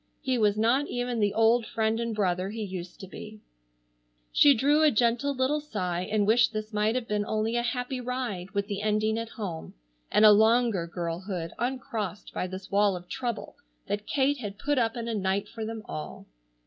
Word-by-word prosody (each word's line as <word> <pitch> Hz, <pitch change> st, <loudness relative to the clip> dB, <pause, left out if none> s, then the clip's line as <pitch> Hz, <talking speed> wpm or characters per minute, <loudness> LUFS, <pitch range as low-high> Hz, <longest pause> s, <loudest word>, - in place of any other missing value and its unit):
He 255 Hz, -2 st, +1 dB
was 210 Hz, -1 st, +3 dB
not 245 Hz, +7 st, +2 dB
even 245 Hz, -1 st, -2 dB
the 205 Hz, -1 st, +1 dB
old 225 Hz, +2 st, +4 dB
friend 220 Hz, 0 st, 0 dB
and 230 Hz, -1 st, -2 dB
brother 185 Hz, -2 st, 0 dB
he 220 Hz, +1 st, -4 dB
used 185 Hz, -3 st, -7 dB
to 190 Hz, -, -8 dB
be. 215 Hz, +3 st, -10 dB, 0.9 s
She 285 Hz, -1 st, +6 dB
drew 290 Hz, +6 st, +3 dB
a 310 Hz, -, +6 dB
gentle 245 Hz, +3 st, +1 dB
little 260 Hz, +4 st, +1 dB
sigh 185 Hz, -11 st, -3 dB
and 210 Hz, -1 st, +2 dB
wished 230 Hz, +2 st, +4 dB
this 215 Hz, +1 st, -5 dB
might 210 Hz, +2 st, +1 dB
have 250 Hz, -2 st, -2 dB
been 210 Hz, 0 st, 0 dB
only 215 Hz, +2 st, -1 dB
a 240 Hz, -, +2 dB
happy 250 Hz, +2 st, -2 dB
ride 240 Hz, -7 st, -3 dB
with 200 Hz, +1 st, -1 dB
the 200 Hz, 0 st, -4 dB
ending 215 Hz, +1 st, +1 dB
at 230 Hz, 0 st, -5 dB
home, 180 Hz, -9 st, -6 dB, 0.4 s
and 215 Hz, -, +5 dB
a 210 Hz, -, +10 dB
longer 220 Hz, -3 st, +4 dB
girlhood 170 Hz, 0 st, -4 dB
uncrossed 230 Hz, -5 st, -3 dB
by 180 Hz, -, -2 dB
this 185 Hz, +1 st, -8 dB
wall 200 Hz, -1 st, +3 dB
of 180 Hz, 0 st, -9 dB
trouble 245 Hz, 0 st, -4 dB, 0.3 s
that 205 Hz, +1 st, -3 dB
Kate 280 Hz, 0 st, +1 dB
had 205 Hz, -4 st, -6 dB
put 290 Hz, +4 st, 0 dB
up 225 Hz, 0 st, 0 dB
in 230 Hz, -1 st, -4 dB
a 230 Hz, -, -2 dB
night 200 Hz, 0 st, 0 dB
for 225 Hz, 0 st, -7 dB
them 220 Hz, 0 st, -5 dB
all. 75 Hz, -3 st, -7 dB
215 Hz, 200 wpm, -28 LUFS, 200-240 Hz, 0.9 s, a